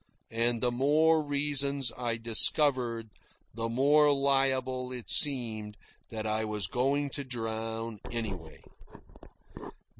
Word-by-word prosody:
And 115 0 0
the 125 - +2
more 155 +5 +2
reasons 140 -2 0
I 120 -2 -3
discovered, 115 0 +1 0.4
the 115 +1 -4
more 145 +5 +3
liable 135 -2 0
it 125 -2 -4
seemed 110 -7 +3 0.3
that 110 -1 -5
I 110 0 -1
was 105 -2 -2
going 140 +6 -1
to 140 - -4
drown 115 -2 -5
anyway. 100 -9 -6
125 Hz, 110 wpm, -29 LUFS, 115-140 Hz, 0.4 s, more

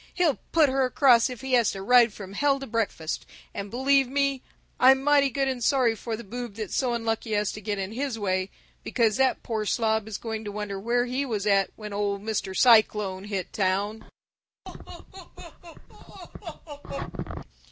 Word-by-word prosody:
He'll 345 -6 +1
put 320 -3 +5
her 270 0 +1
across 255 -1 +4
if 250 -3 -8
he 265 -1 -4
has 235 -4 +4
to 195 -1 -7
ride 240 +1 +5
from 195 -2 -10
hell 275 +5 +1
to 270 - -6
breakfast, 215 -9 -3 0.3
and 200 0 -5
believe 270 +3 +2
me, 275 -1 0 0.4
I'm 265 +1 +6
mighty 285 -1 +4
good 270 +1 -1
and 255 -2 -2
sorry 250 -3 +3
for 225 0 -5
the 235 - -9
boob 235 0 -7
that's 215 -3 -5
so 250 -3 0
unlucky 225 -1 -2
as 210 -1 0
to 215 - -8
get 205 0 -3
in 190 0 -4
his 260 0 -3
way, 185 -2 -1 0.3
because 225 -4 +1
that 265 -1 +1
poor 220 -2 -2
slob 220 0 0
is 220 - -5
going 220 -1 -5
to 205 - -6
wonder 205 -1 -5
where 240 +4 0
he 255 +3 -2
was 215 -7 -3
at 200 -2 +3
when 210 -2 -8
Old 200 -1 -2
Mr. 210 -3 -3
Cyclone 210 -5 +4
hit 195 -3 -4
town! 200 +2 -1
225 Hz, 175 wpm, -26 LUFS, 205-260 Hz, 0.4 s, I'm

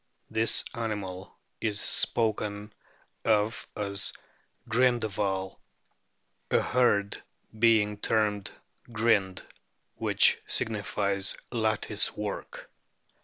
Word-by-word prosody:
The 110 +1 +4
animal 100 -6 -5 0.2
is 105 -2 -1
spoken 105 -2 0 0.5
of 110 +1 +1
as 100 -1 +1 0.3
" - - -40
Grindehval," 110 -6 0 0.9
a - - +3
herd 100 -5 +1 0.4
being: 110 -2 +3
termed 105 -3 0 0.4
"Grind/ 105 -5 +1 0.5
which - - +3
signifies 100 -2 0
lattice 110 -2 0
work. 105 -1 -6
105 Hz, 75 wpm, -28 LUFS, 100-115 Hz, 0.9 s, The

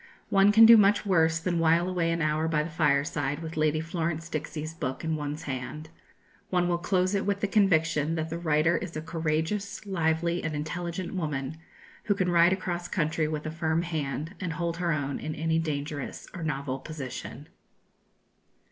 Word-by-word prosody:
One 195 +1 +5
can 225 +2 +8
do 230 0 +10
much 205 0 +4
worse 165 -4 +3
than 170 0 -1
while 165 +2 +3
away 175 -2 0
an 165 -1 0
hour 155 +1 +1
by 155 -2 +1
the 160 - -6
fireside 145 -1 0
with 160 0 -6
Lady 155 0 +2
Florence 165 0 -3
Dixie's 155 +1 -4
book 130 -5 -4
in 160 0 0
one's 150 +1 -4
hand. 145 +3 -5 0.6
One 180 -1 +2
will 175 -1 0
close 185 +1 +1
it 200 - +1
with 200 0 -1
the 205 - +1
conviction 165 -6 +2
that 160 0 -3
the 165 - -3
writer 160 0 +2
is 170 -4 -6
a - - -3
courageous, 165 +6 -2
lively, 170 -2 0
and 155 -1 -2
intelligent 170 +4 -4
woman, 150 -4 -3 0.5
who 205 - +2
can 185 -2 0
ride 170 0 +5
across 175 -2 -2
country 160 -2 0
with 155 0 -4
a 155 - -3
firm 160 0 0
hand, 155 0 -3
and 175 -3 -3
hold 170 +1 -2
her 175 -1 0
own 140 -2 -2
in 155 - -4
any 160 0 0
dangerous 145 -2 -4
or 180 - -7
novel 135 -4 -2
position. 140 -4 -7
160 Hz, 185 wpm, -28 LUFS, 155-175 Hz, 0.6 s, do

